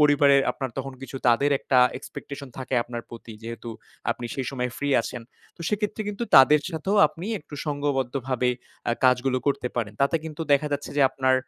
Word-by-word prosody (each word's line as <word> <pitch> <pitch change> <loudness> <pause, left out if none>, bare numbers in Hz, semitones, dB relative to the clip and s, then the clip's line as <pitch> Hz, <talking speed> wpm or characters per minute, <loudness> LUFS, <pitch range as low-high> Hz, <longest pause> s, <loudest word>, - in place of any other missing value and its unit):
পরিবারের 145 -2 +5
আপনার 135 -2 -4
তখন 135 - -4
কিছু 135 0 -7
তাদের 140 +5 +3
একটা 130 -1 +2 0.2
expectation 140 0 -8
থাকে 130 0 -3
আপনার 120 0 -6
প্রতি 115 -1 -10
যেহেতু 115 +1 -7 0.4
আপনি 120 - -4
সেই 135 -2 -3
সময় 125 -2 -2
free 145 -1 0
আছেন। 120 0 -6 0.3
তো, - - -20
সেক্ষেত্রে 210 +1 -1
কিন্তু 210 +3 -3
তাদের 145 +3 +8
সাথেও 185 +5 -1
আপনি 165 +5 -8
একটু 150 - -12
সংঘবদ্ধভাবে 135 -3 -1 0.4
আ - - +3
কাজগুলো 130 0 +3
করতে 140 -3 +1
পারেন। 110 -4 -1
তাতে 140 +4 +3
কিন্তু 160 0 -5
দেখা 145 +1 +3
যাচ্ছে 145 0 -3
যে 145 - +5
আপনার 130 -1 +2
135 Hz, 180 wpm, -25 LUFS, 125-145 Hz, 0.4 s, তাদের